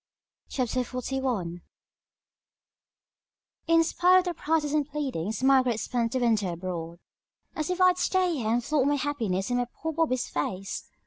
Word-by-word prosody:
CHAPTER 255 -1 -1
XLI 250 -9 -3 2.1
In 330 0 +5
spite 360 +2 +4
of 350 -1 -2
protests 300 -1 0
and 300 -1 +1
pleadings 255 - -3
Margaret 260 -4 +4
spent 235 0 -1
the - - +1
winter 220 -7 +1
abroad. 170 -1 -5 0.6
"As 310 +1 -2
if 365 0 -1
I'd 365 -1 +5
stay 370 -2 +2
here 220 -4 -2
and 240 +1 +1
flaunt 285 0 +1
my 290 - +3
happiness 240 -9 -1
in 245 0 +2
poor 320 +6 -5
Bobby's 285 -6 0
face!" 185 +6 -4
255 Hz, 140 wpm, -27 LUFS, 220-305 Hz, 2.1 s, In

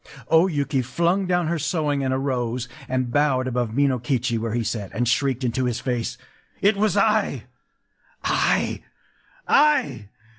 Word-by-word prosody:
”... - - -15
O 165 +3 +5
Yuki 140 -5 0
flung 170 +9 0
down 175 -1 +1
her 170 +1 -1
sewing, 150 -3 -1
and 130 - 0
arose, 125 -2 -2 0.2
and 130 -1 -1
bowed 135 -2 +2
above 125 -2 -1
Minokichi 125 -1 0
where 115 0 -3
he 120 - 0
sat, 105 -3 -3
and 120 +1 0
shrieked 135 +1 +1
into 125 +1 0
his 120 -2 -1
face:— 120 -2 -3 0.4
“It 200 +2 +3
was 205 0 +1
I—I—I! 215 +1 +2
130 Hz, 140 wpm, -23 LUFS, 120-160 Hz, 0.4 s, O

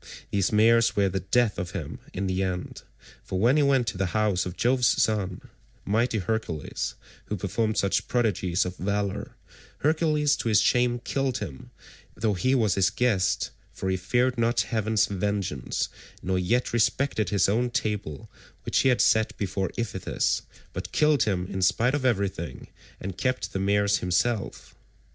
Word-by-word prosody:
These 100 -2 +1
mares 115 +2 +4
were 100 -1 +3
the 95 +1 -2
death 105 +4 +1
of 90 0 -5
him 80 - -6
in 95 - -3
the 95 0 -1
end, 90 -2 -3 0.4
for 95 - -4
when 120 +7 +4
he 155 - +4
went 135 -3 +3
to 95 - -7
the 95 - +1
house 100 -4 +1
of 90 - -7
Jove's 125 +1 +3
son, 100 -4 +1 0.4
mighty 115 +3 +1
Hercules, 95 -6 -3 0.3
who 105 - -3
performed 105 +4 -1
such 100 - +1
prodigies 100 -7 +1
of 90 0 -5
valour, 100 +1 -2 0.5
Hercules 150 -1 +2
to 115 - -2
his 105 -3 +5
shame 120 +2 +2
killed 135 -2 -1
him, 65 -4 -7 0.5
though 110 -1 0
he 130 +9 +1
was 110 -6 +2
his 95 -1 +3
guest, 105 -4 +1 0.2
for 95 - -3
he - - +1
feared 120 +7 0
not 115 +1 +2
heaven's 110 -3 +1
vengeance, 100 -8 -2 0.4
nor 95 0 0
yet 120 +9 0
respected 115 -2 +1
his 100 -2 +3
own 120 +5 +1
table 105 - -3 0.4
which - - +1
he 135 - +4
had 125 - +3
set 110 0 +2
before 95 -1 -2
Iphitus, 105 -6 -1 0.3
but - - -6
killed 150 -4 +3
him 95 -4 0
in 95 0 -4
spite 120 +8 +2
of 145 -2 -1
everything, 95 - -2 0.3
and 95 0 -6
kept 130 -1 -1
the 95 - -1
mares 100 +1 +2
himself. 100 +4 -1
105 Hz, 165 wpm, -26 LUFS, 95-120 Hz, 0.5 s, his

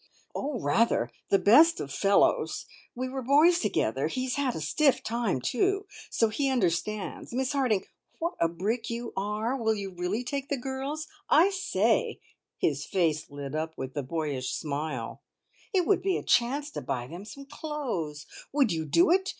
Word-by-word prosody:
"Oh, 275 -3 -3
rather. 145 - +2 0.2
The 195 - +5
best 305 +13 +6
of 140 -1 -5
fellows. 195 +4 +2 0.3
We 255 +1 -2
were 265 +1 -4
boys 300 +7 +5
together. - - 0
He's 255 -1 -2
had 275 -4 0
a - - -3
stiff 270 - +2
time, 230 - 0
too, 390 - +1 0.2
so 225 - +2
he 275 +6 0
understands. 210 -3 -1
Miss 260 +2 0
Harding, 250 -8 +1 0.3
what 335 +1 -2
a 165 - +4
brick 205 +8 -2
you 235 0 -4
are! 210 +5 -1
Will 220 -4 +1
you 200 -2 -5
really 180 +6 -2
take 275 +2 -4
the 280 - 0
girls? 270 +4 -4 0.2
I 345 +6 +6
say" 385 -1 +1 0.4
his - - 0
face 160 -5 0
lit 145 -1 -7
up 160 +1 -3
with 130 0 -5
the 145 - -2
boyish 140 -2 -3
smile 150 +1 -4 0.5
"it 370 -4 +2
would 400 - +3
be 380 0 +1
a - - -5
chance 280 +5 +2
to - - -5
buy 120 -1 -3
them 170 +9 -8
some 275 +7 -10
clothes. 255 - -4 0.3
Would 275 -6 +3
you 160 -1 -1
do 340 - +4
it? 380 +1 +3
235 Hz, 175 wpm, -28 LUFS, 170-280 Hz, 0.5 s, best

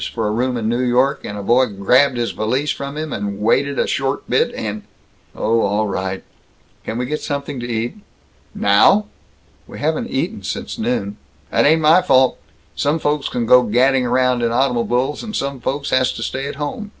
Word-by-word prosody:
for 110 -2 -3
a - - 0
room 125 +3 -1
in 110 -2 -2
New 120 +2 0
York, 130 +3 +1
and 105 - -6
a 100 - -5
boy 125 +5 +3
grabbed 125 +6 +2
his 120 -1 -1
valise 130 +7 -1
from 140 +1 -5
him 155 -1 -4
and 100 -1 -4
wanted 135 +7 +1
a - - +2
short - - -2
bit - - +2
and 105 -1 -4 0.3
" - - -36
"Oh 115 +1 +1
all 105 +2 +1
right! 95 -1 -3 0.6
Can 115 - -4
we 125 - -1
get 150 +4 -3
something 140 -1 -4
to 120 - -5
eat?" 115 - -2 0.6
"Now!?" 105 - +4 0.6
"We - - -10
haven't - - -1
eaten - - -2
since - - -5
noon." 220 - -2 0.3
"That - - +3
ain't 160 +2 +4
my 160 +4 +6
fault! 130 -7 +3 0.4
Some 145 +3 +1
folks 150 -2 -1
can 120 - -2
go 125 +2 +7
gadding 125 +3 +2
around 125 0 +2
in 120 - +1
automobuls, 125 +2 0
and 220 -2 -6
some 140 -1 -3
folks 140 +3 -3
has 130 0 +3
to - - -5
stay 135 +1 -3
at 145 - -6
home. 150 +9 -5
125 Hz, 200 wpm, -19 LUFS, 115-140 Hz, 0.6 s, go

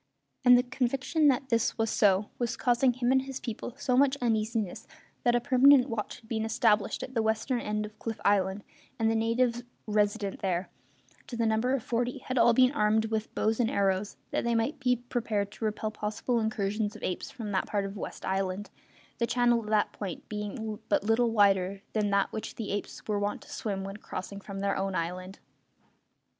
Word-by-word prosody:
And 250 -1 +8
the 245 - +3
conviction 260 +5 +1
that 265 -1 +2
this 230 -2 +1
was 225 -1 0
so 200 0 +3
was 240 -1 -1
causing 245 +1 +3
him 245 0 0
and 265 0 +4
his 265 0 -6
people 235 +1 -6
so 255 -3 0
much 275 +1 +4
uneasiness 220 -4 -1 0.4
that 240 -1 +3
a - - +4
permanent 270 +1 +5
watch 225 +1 -4
had 220 - -20
been 220 -1 -1
established 220 -2 +1
at 260 - -7
the 230 - +1
western 220 +3 0
end 210 0 -2
of 210 0 -12
Cliff 225 -1 -4
Island, 200 0 +2 0.3
and 225 -1 +2
the - - +1
natives 235 +2 +1 0.2
resident 210 -1 0
there, 185 -1 -1 0.6
to 240 - -6
the 230 - +1
number 225 +4 +2
of 255 - -3
forty, 240 +1 -1
had 255 -1 -2
all 235 +1 +6
been 255 +2 +5
armed 220 -2 +1
with 220 0 -2
bows 220 +2 +1
and 230 -2 +2
arrows, 200 -4 0
that - - 0
they 235 0 +1
might 230 +6 0
be 250 -1 +2
prepared 230 -4 -2
to 215 +1 -5
repel 215 0 -2
possible 215 +3 -1
incursions 210 -1 -1
of - - -11
apes 180 - -3
from 220 -4 -6
that 190 - 0
part 205 -2 -1
of 195 +1 -6
West - - -6
Island, 190 +1 -2 0.5
the 235 - +1
channel 240 -1 +3
at 210 - -8
that 215 -1 +2
point 190 -5 -6
being 210 +1 -4
but 300 - +2
little 225 +3 +3
wider 195 -2 +2
than 210 -2 +1
that 200 0 +2
which 220 - -5
the 220 -3 -4
apes 205 0 -5
were 210 -1 0
wont 205 0 -2
to - - -14
swim 195 -3 -3
when 195 +1 -6
crossing 200 -1 -7
from 195 0 -7
their 200 0 +1
own 195 -1 -2
island. 185 +3 -4
220 Hz, 200 wpm, -29 LUFS, 205-245 Hz, 0.6 s, And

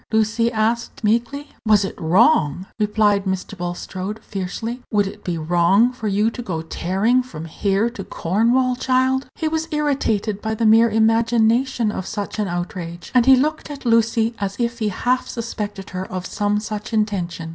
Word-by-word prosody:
Lucy 225 +1 +2
asked, 230 +2 -1
meekly. 240 +7 0
"Was 210 -3 +4
it - - -5
wrong?" 180 - +3
repeated 210 -1 +2
Mr. 190 +1 -3
Bulstrode, 185 +3 -5
fiercely. 215 +6 -5
"Would 205 -2 +3
it 195 - -8
be 175 -2 -2
wrong 175 +9 +3
for 230 -3 -5
you 210 +3 +2
to 245 - -6
go 165 -8 -4
tearing 195 +9 +1
from 165 -11 -8
here 195 +6 0
to 200 -5 -7
Cornwall, 235 +10 +1
child?" 260 +1 +1
He 320 - -2
was 320 +1 -1
irritated 230 -9 0
by 220 0 -2
the 225 - 0
mere 225 +2 +6
imagination 225 +2 +2
of 190 - -5
such 210 0 -4
an 210 - 0
outrage, 175 -1 -5
and 250 -1 +4
he 265 - +9
looked 300 +4 -1
at 285 -2 -8
Lucy 230 0 +2
as 200 -1 -2
if 235 0 -1
he 215 -2 0
half 250 +6 0
suspected 210 -4 -5
her 185 0 -5
of 185 0 -4
some 205 0 0
such 215 +1 -6
intention. 185 -6 -1
215 Hz, 170 wpm, -21 LUFS, 195-235 Hz, -, he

